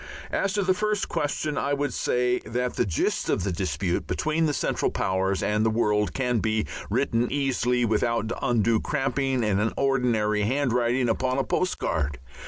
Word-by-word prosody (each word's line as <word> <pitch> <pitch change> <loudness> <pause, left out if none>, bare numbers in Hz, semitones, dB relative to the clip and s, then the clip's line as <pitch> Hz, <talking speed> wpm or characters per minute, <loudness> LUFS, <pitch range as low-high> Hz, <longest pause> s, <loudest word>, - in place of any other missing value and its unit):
As 195 -1 0
to 205 -1 +1
the 185 0 +3
first 210 0 -1
question, 145 0 -1
I 140 - 0
would 140 -3 -2
say 125 0 +1
that 125 +1 -3
the - - +1
gist 85 - -1
of - - +1
the 95 - -1
dispute 85 0 -2
between 155 +1 0
the - - +1
Central - - 0
Powers 95 +1 0
and 105 +1 +1
the 110 - +3
world 105 -2 +1
can 125 -3 +1
be 110 0 0 0.2
written 120 +1 +1
easily 125 -3 +1
without 110 0 0
undue 115 -4 +2
cramping 135 -3 0
in 105 -2 +1
an 110 +2 0
ordinary 120 -6 +1
handwriting 125 +1 +1
upon 130 +3 0
a 135 - +2
postcard. 75 - -1
120 Hz, 170 wpm, -26 LUFS, 105-135 Hz, 0.2 s, the